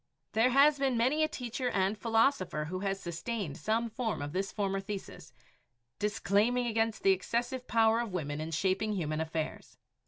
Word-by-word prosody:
There 225 Hz, +3 st, +3 dB
has 280 Hz, +3 st, +5 dB
been 265 Hz, -3 st, +1 dB
many 260 Hz, +7 st, +2 dB
a 310 Hz, -, +4 dB
teacher 250 Hz, -3 st, -3 dB
and 195 Hz, 0 st, +1 dB
philosopher 225 Hz, -, +1 dB
who 185 Hz, +4 st, -4 dB
has 195 Hz, 0 st, -2 dB
sustained 175 Hz, -, -4 dB
some 225 Hz, +2 st, 0 dB
form 225 Hz, -1 st, -3 dB
of 145 Hz, +1 st, -5 dB
this 195 Hz, +1 st, -1 dB
former 195 Hz, -2 st, -1 dB
thesis, 195 Hz, 0 st, -7 dB, 0.7 s
disclaiming 210 Hz, +4 st, +1 dB
against 225 Hz, -1 st, 0 dB
the 195 Hz, -, +6 dB
excessive 240 Hz, +6 st, -1 dB
power 225 Hz, 0 st, +4 dB
of 235 Hz, -3 st, -3 dB
women 150 Hz, -4 st, -3 dB
in 160 Hz, -, -4 dB
shaping 190 Hz, +6 st, 0 dB
human 155 Hz, -5 st, -2 dB
affairs. 160 Hz, -1 st, -4 dB
215 Hz, 165 wpm, -31 LUFS, 185-235 Hz, 0.7 s, the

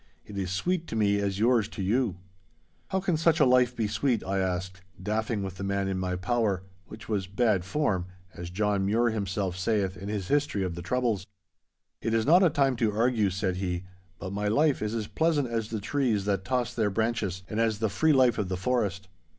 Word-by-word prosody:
It 105 Hz, -, -10 dB
is 95 Hz, -2 st, -2 dB
sweet 170 Hz, -, -1 dB
to -, -, -5 dB
me 100 Hz, -2 st, +2 dB
as 100 Hz, -1 st, -1 dB
yours 115 Hz, 0 st, +3 dB
to 100 Hz, -, -6 dB
you.' 110 Hz, -1 st, +1 dB, 0.7 s
'How 190 Hz, -, 0 dB
can 180 Hz, -4 st, +1 dB
such 165 Hz, 0 st, +3 dB
a 150 Hz, -, +6 dB
life 125 Hz, -1 st, +4 dB
be 115 Hz, -3 st, 0 dB
sweet?' 120 Hz, +1 st, 0 dB
I 95 Hz, +1 st, -1 dB
asked, 90 Hz, 0 st, -2 dB, 0.2 s
daffing 105 Hz, +2 st, -1 dB
with 95 Hz, -1 st, -6 dB
the 95 Hz, -, -5 dB
man 100 Hz, 0 st, -1 dB
in 95 Hz, -1 st, -2 dB
my 90 Hz, -1 st, -1 dB
power—which 95 Hz, -1 st, -3 dB
was 100 Hz, -4 st, -1 dB
'bad 100 Hz, -1 st, +1 dB
form,' 95 Hz, -5 st, -1 dB, 0.3 s
as 85 Hz, 0 st, -7 dB
John 100 Hz, +1 st, 0 dB
Mure 115 Hz, +3 st, +2 dB
himself 100 Hz, -3 st, -2 dB
sayeth 95 Hz, -1 st, 0 dB
in 100 Hz, +3 st, -6 dB
his 100 Hz, -4 st, -3 dB
history 145 Hz, -6 st, +1 dB
of 90 Hz, -2 st, -2 dB
the 85 Hz, -, -6 dB
troubles. 110 Hz, -1 st, -1 dB, 0.7 s
'It 115 Hz, -, 0 dB
is 115 Hz, -, +1 dB
not 170 Hz, +6 st, +6 dB
a 180 Hz, -, +5 dB
time 140 Hz, -3 st, +2 dB
to 115 Hz, -2 st, +1 dB
argue,' 110 Hz, -1 st, +2 dB
said 95 Hz, 0 st, -2 dB
he, 90 Hz, -1 st, -2 dB, 0.3 s
'but 95 Hz, 0 st, -6 dB
my 105 Hz, +1 st, -1 dB
life 145 Hz, +6 st, +2 dB
is 105 Hz, +1 st, -2 dB
as 110 Hz, -2 st, -2 dB
pleasant 155 Hz, +1 st, +1 dB
as 115 Hz, -2 st, -2 dB
the 110 Hz, -, -3 dB
trees 110 Hz, -3 st, 0 dB
that 100 Hz, -2 st, 0 dB
toss 125 Hz, 0 st, -1 dB
their 110 Hz, -3 st, +1 dB
branches, 105 Hz, -3 st, -1 dB
and 110 Hz, -, -3 dB
as 115 Hz, -2 st, +2 dB
the 110 Hz, +1 st, 0 dB
free 155 Hz, +10 st, +2 dB
life 130 Hz, -5 st, +4 dB
of 100 Hz, -3 st, -1 dB
the 95 Hz, -, -2 dB
forest. 100 Hz, -3 st, -1 dB
105 Hz, 215 wpm, -28 LUFS, 95-120 Hz, 0.7 s, a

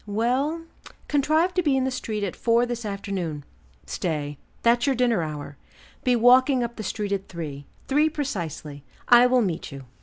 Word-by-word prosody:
"Well 255 Hz, +10 st, 0 dB, 0.4 s
contrive 310 Hz, +5 st, +2 dB
to 360 Hz, -, +2 dB
be 290 Hz, -5 st, +2 dB
in 260 Hz, -, +1 dB
the 265 Hz, -, 0 dB
street 220 Hz, -4 st, -3 dB
at 195 Hz, -, -3 dB
four 235 Hz, +1 st, +2 dB
this 240 Hz, -1 st, -4 dB
afternoon. 190 Hz, -7 st, -4 dB, 0.4 s
Stay, 145 Hz, -4 st, -3 dB, 0.2 s
that's 235 Hz, +3 st, +3 dB
your 275 Hz, -, +2 dB
dinner 240 Hz, -6 st, +2 dB
hour; 150 Hz, -2 st, -6 dB, 0.5 s
be 250 Hz, -1 st, +3 dB
walking 250 Hz, +2 st, +5 dB
up 235 Hz, 0 st, -4 dB
the -, -, -6 dB
street 210 Hz, 0 st, -3 dB
at 195 Hz, -1 st, -2 dB
three, 145 Hz, -5 st, -7 dB, 0.2 s
three 300 Hz, +3 st, +3 dB
precisely; 170 Hz, -, -5 dB, 0.3 s
I 245 Hz, 0 st, +8 dB
will 250 Hz, -1 st, +3 dB
meet 170 Hz, -5 st, -3 dB
you." 135 Hz, -1 st, -9 dB
230 Hz, 175 wpm, -25 LUFS, 170-260 Hz, 0.5 s, I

